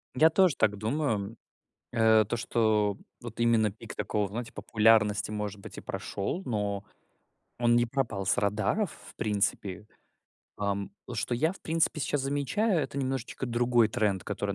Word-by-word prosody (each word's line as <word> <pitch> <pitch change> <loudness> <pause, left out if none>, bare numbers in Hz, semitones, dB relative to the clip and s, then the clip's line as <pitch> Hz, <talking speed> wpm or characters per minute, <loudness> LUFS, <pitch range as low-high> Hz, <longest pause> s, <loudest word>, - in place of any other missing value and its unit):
Я 155 +5 +6
тоже 180 -2 +4
так 105 -2 +2
думаю. 110 -2 -1 0.6
Э, 110 -2 +5
то, 120 - -2
что 110 -3 +1 0.2
вот - - -9
именно 115 -3 +3
пик 115 +2 -10
такого, 105 - -1
вот 100 - -3
знаете, 115 +1 -5
популярности, 105 -2 +3
может 105 -1 -4
быть, - - -10
и - - -6
прошел, 100 - -4
но 105 -4 -2 0.8
он 120 -1 +4
не 120 0 +4
пропал 115 -6 -2
с 100 - +2
радаров 110 - +1 0.2
в - - -16
принципе. 100 -2 -1 0.7
Ам, 100 -1 -2 0.2
что - - -1
я, 155 +8 +1
в 190 - -15
принципе, 160 -1 0
щас 145 0 0
замечаю, 145 - +1
это 140 -1 -4
немножечко 130 -1 -3
другой 120 -1 +3
тренд, 105 -5 0
который 100 -1 -2
110 Hz, 155 wpm, -29 LUFS, 105-130 Hz, 0.8 s, Я